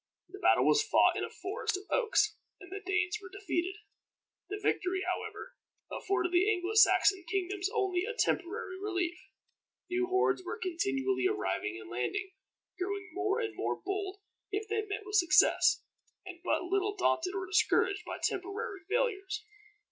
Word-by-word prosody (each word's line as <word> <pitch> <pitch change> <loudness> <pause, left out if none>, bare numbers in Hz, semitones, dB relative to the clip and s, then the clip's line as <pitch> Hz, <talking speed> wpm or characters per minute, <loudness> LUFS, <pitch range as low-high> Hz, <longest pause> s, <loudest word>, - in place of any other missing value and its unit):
The 390 +2 -10
battle - - +4
was 430 - +5
fought 430 - +4
in - - -1
a - - -3
forest 385 0 -3
of 380 - -9
oaks, 435 -3 +2 0.2
and 380 -2 -13
the 395 - -4
Danes 365 +1 0
were 380 - -10
defeated. 380 -1 -2 0.7
The 410 - -3
victory, 375 -2 0
however, - - -4 0.4
afforded 360 -3 -1
the 365 +3 +4
Anglo 370 0 -1
Saxon 410 -3 +5
kingdoms 390 0 -1
only 365 -2 +1
a 475 +1 -4
temporary 370 -3 -1
relief. 360 -4 -1 0.8
New 360 0 +1
hordes 375 0 +2
were 370 +5 -4
continually 135 - 0
arriving 105 +3 -2
and 110 +1 -11
landing, 125 - -2 0.5
growing 390 0 -3
more 395 +3 0
and 435 -2 -3
more - - -2
bold 390 0 -3 0.3
if 415 +1 -3
they 435 +1 0
met 415 0 -5
with 415 0 +1
success, 345 -5 +5 0.4
and 360 -2 -9
but 365 - +1
little 395 +3 0
daunted 370 -1 +1
or 380 -1 -2
discouraged 395 +1 +2
by - - -5
temporary 400 +2 -3
failures. 430 -3 -1
385 Hz, 155 wpm, -31 LUFS, 360-410 Hz, 0.8 s, was